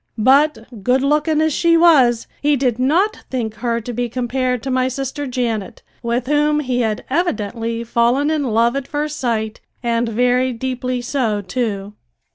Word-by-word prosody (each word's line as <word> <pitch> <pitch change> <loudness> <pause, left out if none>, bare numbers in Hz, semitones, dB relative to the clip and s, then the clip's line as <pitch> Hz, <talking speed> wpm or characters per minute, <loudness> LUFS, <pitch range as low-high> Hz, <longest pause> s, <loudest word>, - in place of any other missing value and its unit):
But, 255 -2 +2
good 255 +3 +2
looking 300 +2 +2
as 315 -1 +1
she 335 +2 +3
was, 270 -9 +5 0.2
he 295 0 +3
did 250 -3 0
not 345 +12 +2
think 235 -4 -2
her 235 -1 -1
to 245 +2 -6
be 240 +1 -2
compared 250 0 -1
to 265 - -3
my 255 0 +2
sister 270 +2 -4
Janet, 235 -6 -3 0.2
with 235 +1 -1
whom 295 +2 +2
he 255 -3 -1
had 220 -2 -2
evidently 230 - -2
fallen 240 +6 +1
in 305 -3 0
love 235 +1 +2
at 275 -1 -3
first 300 0 -3
sight 220 -3 -2 0.2
and 235 0 0
very 250 +3 +1
deeply 255 +1 -3
so, 235 -4 -1
too! 205 -1 -3
250 Hz, 165 wpm, -19 LUFS, 230-280 Hz, 0.2 s, was